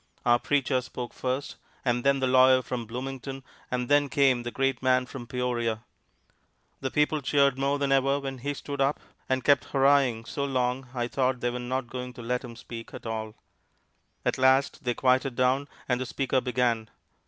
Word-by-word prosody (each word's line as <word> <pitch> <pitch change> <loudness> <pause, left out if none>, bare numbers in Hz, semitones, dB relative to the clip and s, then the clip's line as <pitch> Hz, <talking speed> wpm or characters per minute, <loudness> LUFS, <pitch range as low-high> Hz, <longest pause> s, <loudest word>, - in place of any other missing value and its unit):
Our 120 0 +5
preacher 135 -2 +1
spoke 125 -1 -7
first, 130 +2 -3 0.3
and 120 -1 +1
then 140 -1 +3
the - - +2
lawyer 130 0 +5
from 120 -1 -4
Bloomington, 135 +2 -6 0.3
and 125 -1 -2
then 145 0 +3
came 135 -3 +3
the 120 - -4
great 135 +2 -1
man 130 -1 +3
from 125 -1 -9
Peoria. 120 -3 -1 1.0
The 130 - -2
people 150 +2 +1
cheered 140 -1 +2
more 140 +1 +1
than 140 -1 0
ever 135 +1 +3
when 135 -2 -5
he 145 +3 -3
stood 140 0 -5
up, 135 +2 +2 0.3
and 130 -1 +1
kept 140 -2 +4
hurrahing 135 -4 +3
so 140 +4 -3
long 130 -1 -1
I 120 -1 -1
thought 130 0 0
they 120 - 0
were 125 - -4
not 130 +1 -2
going 125 +1 -6
to 120 - -9
let 125 +2 -1
him 120 -2 -9
speak 115 -1 -9
at - - -10
all. 110 -1 -4 0.9
At - - 0
last 130 +1 +3
they 120 -1 0
quieted 130 0 +2
down, 130 +3 +2 0.2
and 125 -1 0
the 130 - -3
speaker 130 +1 0
began. 120 -3 0
130 Hz, 190 wpm, -27 LUFS, 125-135 Hz, 1.0 s, Our